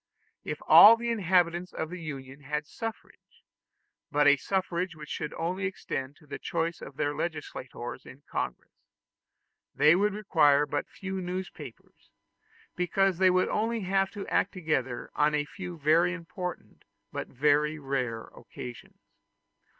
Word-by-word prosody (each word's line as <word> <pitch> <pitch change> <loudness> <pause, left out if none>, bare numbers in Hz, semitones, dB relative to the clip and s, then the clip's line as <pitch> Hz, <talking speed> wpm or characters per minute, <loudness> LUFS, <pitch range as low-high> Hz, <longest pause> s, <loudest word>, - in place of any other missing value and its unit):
If - - -4
all 225 +2 +10
the 235 0 -2
inhabitants 180 -4 +1
of 160 +1 -4
the 180 -1 -6
Union 135 -3 -7
had 150 +2 -3
the 145 - -27
suffrage 225 -2 -8 0.7
but 145 0 +3
a 145 0 +7
suffrage 185 +2 -2
which 150 -1 -10
should 150 - -3
only 185 +4 -2
extend 140 -7 -5
to 150 - -21
the 145 - -7
choice 165 0 -2
of 135 0 -10
their 145 -1 0
legislators 145 -7 -5
in 140 +2 -13
Congress - - -4 1.0
they 150 +3 +6
would 205 +2 +1
require 150 -8 +4
but - - -3
few 190 -1 -5
newspapers, 185 +1 -8 0.7
because 185 0 +1
they 190 -1 +6
would 185 0 +2
only 225 +1 0
have 195 0 +1
to 205 -2 -6
act 195 - +1
together 135 -9 -2
on 150 0 +2
a 145 0 0
few 180 +2 -8
very 160 +4 +3
important 180 +1 -7 0.3
but - - -4
very 150 +3 +2
rare 130 -5 -2
occasions. 120 -1 -10
165 Hz, 145 wpm, -29 LUFS, 145-185 Hz, 1.0 s, all